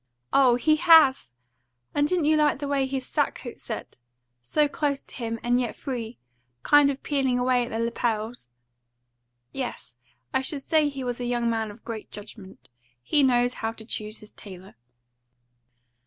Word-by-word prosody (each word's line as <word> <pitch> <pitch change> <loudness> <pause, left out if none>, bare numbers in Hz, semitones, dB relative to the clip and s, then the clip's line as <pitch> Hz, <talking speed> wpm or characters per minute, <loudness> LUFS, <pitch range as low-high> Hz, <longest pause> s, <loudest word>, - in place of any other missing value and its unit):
"Oh, 260 -3 +5
he 310 +5 +2
HAS! 315 - +6 0.6
And 290 0 +2
didn't 350 -2 +1
you 310 +1 +4
like 300 -2 +3
the 285 +1 -4
way 275 -1 +1
his 265 -1 -3
sackcoat - - -2
set? - - -7 0.4
So 295 - +1
close 285 -1 -2
to - - -19
him, 230 -2 -4
and 245 +1 +2
yet 240 - -3
free 245 -4 -5 0.5
kind 290 -1 +6
of 275 -1 -4
peeling 270 -4 +1
away 250 -1 +2
at - - -9
the 225 - -3
lapels?" 230 - -2 1.0
"Yes, 250 - -6 0.4
I - - +2
should 275 +1 -3
say 310 -1 +2
he 275 -2 -6
was 245 -1 -3
a 245 - -3
young 240 -1 0
man 225 -1 -1
of 210 +2 -13
great 225 -2 -6
judgment. 195 - -11 0.4
He 295 - +2
knows 245 -2 +3
how 225 0 -1
to 220 - -11
choose 215 -1 -5
his 210 - -14
tailor." 190 -2 -12
245 Hz, 170 wpm, -26 LUFS, 225-280 Hz, 1.0 s, HAS